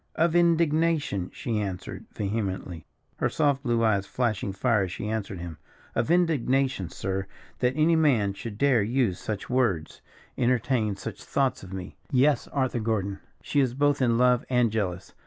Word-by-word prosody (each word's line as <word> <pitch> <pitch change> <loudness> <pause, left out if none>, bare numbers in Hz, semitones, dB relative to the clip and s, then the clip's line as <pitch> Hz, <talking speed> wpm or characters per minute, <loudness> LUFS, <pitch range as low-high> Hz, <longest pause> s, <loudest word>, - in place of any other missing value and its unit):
"Of 165 +1 +2
indignation!" 165 - +2
she 115 -3 -2
answered, 95 -3 -5
vehemently, 95 -5 -3 0.3
her - - +1
soft 145 -3 +1
blue 120 -4 +1
eyes 100 -3 +2
flashing 110 -6 -1
fire 105 0 +1
as 90 - -7
she 105 - -5
answered 105 -3 -3
him. 85 -3 -7 0.3
"Of - - 0
indignation, 135 - +2
sir, 95 +1 -3 0.3
that 125 0 +2
any 155 +2 +4
man 125 -11 +3
should 105 0 -7
dare 130 -3 +4
use 115 -3 0
such 105 -2 -4
words, 120 -11 0 0.4
entertain 120 -3 +1
such - - -7
thoughts 135 -2 0
of 95 - -11
me. 95 -1 -7
Yes, 140 +2 +3
Arthur 130 -3 -1
Gordon, 100 -3 -1 0.2
she 145 - 0
is 130 -3 +1
both 145 0 +2
in 120 -2 +3
love 125 0 +4
and 125 -3 +3
jealous. 95 -4 -3
115 Hz, 160 wpm, -27 LUFS, 100-135 Hz, 0.4 s, any